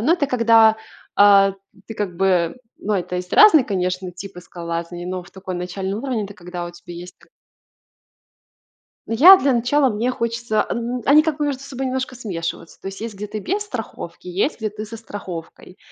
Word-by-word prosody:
ну, 285 +9 +3
это 325 -5 +1
когда, 230 -4 +5 0.4
а, 200 -1 +6 0.3
ты 225 - -7
как 190 -5 -4
бы 180 0 +1 0.2
Ну, 210 - -2
это 180 -1 -2
есть 180 0 -6
разные, 405 -10 +7
конечно, 185 -2 -2
типы 185 0 -9
скалолазания, 170 0 -6
но 185 0 -4
в - - -17
такой 190 -1 -6
начальный 190 +2 -4
уровень- 245 -5 -2
это 200 - -12
когда 180 -1 -7
у 175 - -6
тебя 175 0 -12
есть 175 +1 -10
т - - -23 1.8
Я, 330 +13 +8
для 275 -3 +1
начала, 265 +4 +2
мне 235 +2 -1
хочется, 235 -3 -1
а - - -4
н 235 +1 -3
они 300 +2 +7
как 310 -2 -2
бы 295 - 0
между 275 -2 -3
собой 270 -1 -5
немножко 260 0 -3
смешиваются. 170 -8 -6
То - - -6
есть, 195 - -9
есть, 225 -1 -5
где 205 +2 -6
ты 215 - -5
без 390 - -2
страховки, 225 - -7
и - - -5
есть, 200 - -1
где 220 -1 -2
ты 215 +1 -7
со 225 +2 -8
страховкой. 185 -5 -9
210 Hz, 195 wpm, -21 LUFS, 180-250 Hz, 1.8 s, Я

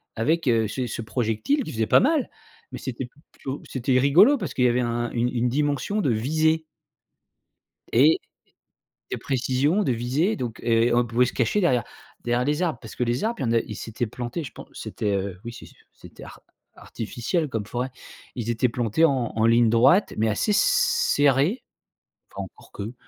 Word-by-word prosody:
avec, 155 +7 0
heu, 115 -3 +3
ce 125 +3 -3
ce 115 - -5
projectile 120 - -1
qui - - -7
faisait 110 -1 0
pas - - +6
mal, 290 +1 +1 0.4
mais - - -7
c'était 130 0 -5 0.3
plutôt 135 +1 -6
c'était 130 0 +1
rigolo 180 - +6
parce - - -5
qu'il 125 - +1
y - - +6
avait 120 +1 +1
un 120 0 -2
une 120 +1 0
une 125 0 0
dimension 145 - 0
de 140 - +1
visée 155 +8 +1 1.3
et 145 +7 +5 0.9
et - - -2
précision 135 +8 0
de 130 - +1
visée, 130 - 0
donc 120 -4 -5
et 115 +1 +2
on 120 0 +3
pouvait 120 +2 +2
se 125 - -3
cacher 130 - +1
derrière 125 - +2 0.4
derrière 120 +1 +1
les 150 +4 0
arbres, 165 -8 0
parce 110 - -10
que - - -1
les 120 - -1
arbres, 230 +2 -1
il - - -2
y - - 0
en 115 - 0
a, 115 - +4
ils 105 -3 -7
étaient 115 +2 -2
plantés, 120 +7 -5
je 130 - -8
pen - - -11
c'était, 105 -1 -3
heu, 95 -2 -4
oui, 120 - -6
c'est - - -11
ce - - -17 0.2
c'était - - -14
ar - - -12 0.3
artificiel 120 - -3
comme 110 -4 -3
forêt. 125 +4 -3 0.5
Ils 120 -3 -4
étaient 120 +2 +1
plantés 120 +6 +1
en 130 -7 0
en 110 0 +2
ligne 115 0 +4
droite, 130 - +4
mais 110 +1 +2
assez 110 - 0
serrés. 175 - +2 0.7
Enfin, - - -5
encore - - -17
que 105 +4 -6
125 Hz, 195 wpm, -24 LUFS, 115-150 Hz, 1.3 s, pas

